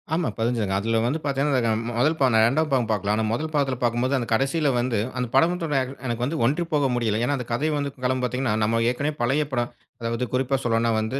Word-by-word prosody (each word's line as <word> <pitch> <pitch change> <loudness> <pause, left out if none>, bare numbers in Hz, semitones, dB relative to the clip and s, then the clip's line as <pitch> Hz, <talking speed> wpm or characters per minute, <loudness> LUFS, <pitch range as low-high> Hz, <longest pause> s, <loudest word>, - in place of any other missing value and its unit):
ஆமா 170 -1 0
பதிஞ்சதுங்க. 115 -4 0
அதுல 115 +2 0
வந்து 150 +6 0
பாத்தீங்கன்னா 135 -4 +1 0.3
முதல் 155 +4 +2
பா 135 - +4 0.2
2வது 155 +7 +2
பாகம் 120 -4 +2
பாக்கல. 105 -1 0
ஆனா 110 - 0
முதல் 155 +7 -2
பாகத்தில 140 -4 +1
பாக்கும்போது 120 +3 +1
அந்த 120 -2 -3
கடைசில 140 +5 +1
வந்து 120 -3 0 0.2
அந்த 125 -1 -1
படம் 165 +6 +4
தோ - - -1
எனக்கு 130 -2 -4
வந்து 155 +5 -2
ஒன்றி 150 +7 +1
போக 145 -2 +2
முடியல. 110 -3 0
ஏனா 145 +3 +1
அந்த 125 - -6
கதை 150 +7 0
வந்து 140 -1 -2
காலம் 130 0 0
பாத்தீங்கன்னா 125 -1 0
நம்ம 115 +2 +1
ஏற்கனவே 145 +4 -2
பழைய 145 +5 +1
படம். 120 -1 -1 0.3
அதாவது 115 +2 -1
குறிப்பா 135 +1 +1
சொல்லனுனா 115 0 +1
வந்து 120 +6 -2
125 Hz, 210 wpm, -24 LUFS, 115-140 Hz, 0.3 s, பா